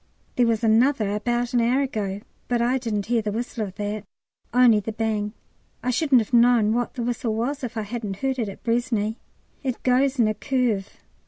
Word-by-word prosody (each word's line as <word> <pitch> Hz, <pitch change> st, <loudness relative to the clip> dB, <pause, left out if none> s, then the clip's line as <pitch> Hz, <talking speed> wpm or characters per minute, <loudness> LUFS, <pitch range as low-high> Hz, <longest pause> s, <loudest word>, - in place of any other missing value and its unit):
There 245 Hz, -1 st, +3 dB
was 230 Hz, 0 st, 0 dB
another 225 Hz, -1 st, +3 dB
about 240 Hz, +4 st, -1 dB
an 240 Hz, -, +3 dB
hour 245 Hz, +4 st, +2 dB
ago, 205 Hz, -7 st, -3 dB, 0.3 s
but 240 Hz, -1 st, +1 dB
I 245 Hz, +3 st, +2 dB
didn't 215 Hz, -5 st, -2 dB
hear 235 Hz, 0 st, +1 dB
the 210 Hz, -1 st, -2 dB
whistle 225 Hz, -1 st, -3 dB
of 190 Hz, -, -11 dB
that 205 Hz, 0 st, -3 dB, 0.5 s
only 240 Hz, -3 st, +5 dB
the 210 Hz, +2 st, -4 dB
bang. 215 Hz, -1 st, -2 dB, 0.5 s
I 250 Hz, -, +1 dB
shouldn't 260 Hz, -1 st, +4 dB
have 220 Hz, -, -7 dB
known 235 Hz, -2 st, +5 dB
what 240 Hz, 0 st, -1 dB
the 245 Hz, -, -3 dB
whistle 235 Hz, -2 st, -1 dB
was 265 Hz, +5 st, -2 dB
if 235 Hz, -2 st, -5 dB
I 220 Hz, -, -1 dB
hadn't 210 Hz, -2 st, -4 dB
heard 265 Hz, +4 st, -2 dB
it 220 Hz, -4 st, -1 dB
at 195 Hz, -, -11 dB
Braisne. 230 Hz, -2 st, 0 dB, 0.5 s
It 260 Hz, -4 st, -3 dB
goes 260 Hz, +2 st, +2 dB
in 235 Hz, -3 st, +4 dB
a 215 Hz, -, +1 dB
curve. 235 Hz, -6 st, -1 dB
235 Hz, 200 wpm, -24 LUFS, 215-250 Hz, 0.5 s, only